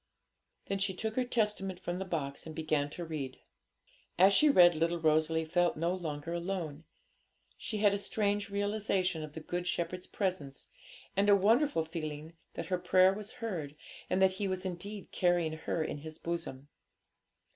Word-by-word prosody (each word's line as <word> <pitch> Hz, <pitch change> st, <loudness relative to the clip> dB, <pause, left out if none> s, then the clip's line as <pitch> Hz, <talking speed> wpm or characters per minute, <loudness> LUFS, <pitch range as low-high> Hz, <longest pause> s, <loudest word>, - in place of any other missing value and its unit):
Then 195 Hz, -, -2 dB
she 190 Hz, -1 st, 0 dB
took 220 Hz, +3 st, -3 dB
her 255 Hz, -, +2 dB
Testament 210 Hz, -6 st, -1 dB
from 175 Hz, 0 st, -3 dB
the 190 Hz, -, -3 dB
box 150 Hz, -5 st, -3 dB
and 160 Hz, -, -8 dB
began 155 Hz, -2 st, 0 dB
to 170 Hz, +3 st, -6 dB
read. 145 Hz, -5 st, -5 dB, 0.8 s
As 190 Hz, +2 st, +7 dB
she 300 Hz, +8 st, +6 dB
read, 175 Hz, -10 st, +7 dB
little 165 Hz, +2 st, 0 dB
Rosalie 160 Hz, 0 st, +2 dB
felt 175 Hz, +1 st, +1 dB
no 170 Hz, +3 st, +1 dB
longer 165 Hz, -3 st, -4 dB
alone. 170 Hz, -3 st, -3 dB, 0.7 s
She 215 Hz, -, -4 dB
had 205 Hz, -1 st, +4 dB
a 200 Hz, -, -1 dB
strange 205 Hz, 0 st, -1 dB
realisation 200 Hz, -4 st, 0 dB
of 150 Hz, -1 st, -8 dB
the 160 Hz, -, -7 dB
Good 175 Hz, +2 st, -3 dB
Shepherd's 180 Hz, +1 st, -2 dB
presence, 180 Hz, -9 st, -3 dB, 0.5 s
and 200 Hz, +1 st, +3 dB
a 205 Hz, -, +8 dB
wonderful 215 Hz, -, +3 dB
feeling 155 Hz, -1 st, -6 dB, 0.2 s
that -, -, -4 dB
her 180 Hz, -2 st, -1 dB
prayer 185 Hz, +1 st, +5 dB
was 210 Hz, +1 st, -7 dB
heard, 175 Hz, -, -4 dB, 0.3 s
and 185 Hz, -, +1 dB
that 190 Hz, -, +6 dB
He 195 Hz, +1 st, -2 dB
was 185 Hz, 0 st, -3 dB
indeed 195 Hz, +3 st, -5 dB
carrying 175 Hz, -3 st, +2 dB
her 160 Hz, +1 st, -2 dB
in 150 Hz, -, -4 dB
His 155 Hz, +1 st, -8 dB
bosom. 165 Hz, -5 st, -5 dB
175 Hz, 170 wpm, -32 LUFS, 160-195 Hz, 0.8 s, a